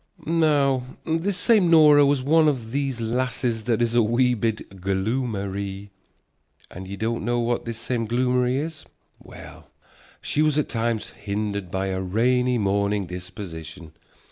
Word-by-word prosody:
Now 145 -5 +2 0.2
this 165 +4 -1
same 200 -3 +3
Nora 150 -3 +7
was 140 -2 +1
one 155 +3 +4
of 120 -6 -1
these 135 -2 -2
lasses 120 -1 -2
that 120 -1 +1
is 115 0 -1
a 120 - +4
wee 120 +3 +2
bit 110 -4 -3
gloomery. 100 -1 -3 0.8
And 95 +1 -9
ye 100 - -6
don't 115 +1 -2
know 120 +2 0
what 120 0 -1
this 115 -1 -5
same 115 -1 -2
gloomery 125 +1 +1
is? 150 +1 -4 0.4
Well, - - -13 0.5
she 150 - -1
was 155 -1 +2
at 150 - 0
times 115 -1 -2
hindered 100 -2 -4
by 95 +1 -2
a 95 0 -2
rainy 125 +6 +1
mornin' 100 -1 0
disposition. 85 -3 -9
115 Hz, 145 wpm, -24 LUFS, 100-135 Hz, 0.8 s, Nora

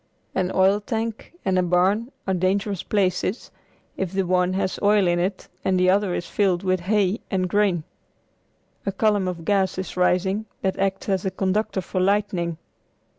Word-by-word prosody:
An 185 0 0
oil 190 +2 +4
tank 225 +1 -4
and 185 -1 +2
a - - +4
barn 185 +7 +2
are 190 - 0
dangerous 190 +1 0
places, 190 +1 -1 0.5
if 190 -3 -2
the 195 0 0
one 180 0 +2
has 190 0 -1
oil 205 -1 +4
in 175 0 +2
it 185 +2 -2 0.2
and 185 -1 +2
the 185 0 +4
other 195 -2 +1
is 175 - -3
filled 190 -3 +1
with 185 -1 +1
hay 200 +3 +1
and 185 -2 0
grain. 190 -4 +1 1.0
A 195 - -1
column 205 -1 +1
of 170 -3 -5
gas 195 -3 +1
is 185 - -5
rising 190 +4 +1 0.2
that 190 -1 -1
acts 195 0 -1
as 190 -2 0
a 190 - 0
conductor 190 +1 -1
for 185 +1 -2
lightning. 185 -4 0
190 Hz, 175 wpm, -23 LUFS, 185-205 Hz, 1.0 s, oil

